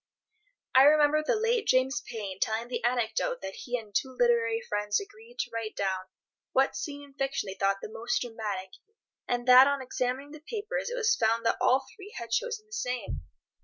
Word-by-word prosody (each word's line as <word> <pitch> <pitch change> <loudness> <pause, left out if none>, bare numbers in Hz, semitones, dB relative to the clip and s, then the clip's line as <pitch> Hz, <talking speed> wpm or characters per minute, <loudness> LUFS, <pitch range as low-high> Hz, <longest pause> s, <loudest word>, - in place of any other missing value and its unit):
I 260 - +8
remember 300 0 +5
the 455 - +1
late 455 +1 +1
James 265 +2 +3
Payn 200 -5 -5
telling 225 +2 0
the - - -3
anecdote 240 0 0
that 190 0 -5
he 245 +4 -3
and 215 -3 -11
two 265 - 0
literary 230 -2 +3
friends 205 0 0
agreed 440 +4 -12
to - - -2
write 225 -1 -4
down 190 -1 -1 0.5
what 270 +1 +3
scene 290 -7 -5
in 280 -1 -15
fiction 270 -4 -2
they 190 - -5
thought 195 +1 0
the - - -3
most 225 +2 -2
dramatic, 210 -6 -4 0.6
and 245 0 -1
that 255 +2 +9
on 280 0 +1
examining 260 +2 -3
the 310 - -10
papers 450 +9 -4
it - - -3
was 475 -1 +3
found 230 - +1
that 230 - +2
all 265 +1 +3
three 410 0 -12
had 230 -1 -7
chosen 445 - -1
the 430 - -17
same. 250 - -3
255 Hz, 195 wpm, -29 LUFS, 225-305 Hz, 0.6 s, that